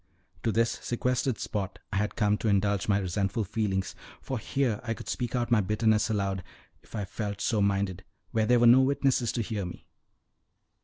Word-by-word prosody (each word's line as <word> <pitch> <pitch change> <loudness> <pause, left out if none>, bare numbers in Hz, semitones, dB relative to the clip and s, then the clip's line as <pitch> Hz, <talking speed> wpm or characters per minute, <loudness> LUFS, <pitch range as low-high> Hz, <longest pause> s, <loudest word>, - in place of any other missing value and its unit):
To 115 - +1
this 115 +2 +1
sequestered 125 0 0
spot 100 -3 -3 0.2
I - - +1
had 105 +1 -1
come 105 -2 +2
to - - -2
indulge 100 -1 +2
my 100 -2 +3
resentful 100 +3 -1
feelings; 100 -2 -1 0.3
for 130 -3 -4
here 120 -2 -1
I 115 -2 -2
could - - -10
speak 120 -1 -2
out 120 -1 -1
my 115 -3 +5
bitterness 105 +2 +2
aloud, 100 -3 -1 0.4
if - - -13
I 105 -2 -2
felt 100 +1 -4
so 110 -3 +1
minded, 100 -2 0 0.3
where 110 -2 +1
there 125 +1 +5
were 120 - +5
no 120 +3 +8
witnesses 130 -3 +2
to 120 - -1
hear 105 -2 -3
me. 90 -1 -8
105 Hz, 190 wpm, -28 LUFS, 100-120 Hz, 0.4 s, no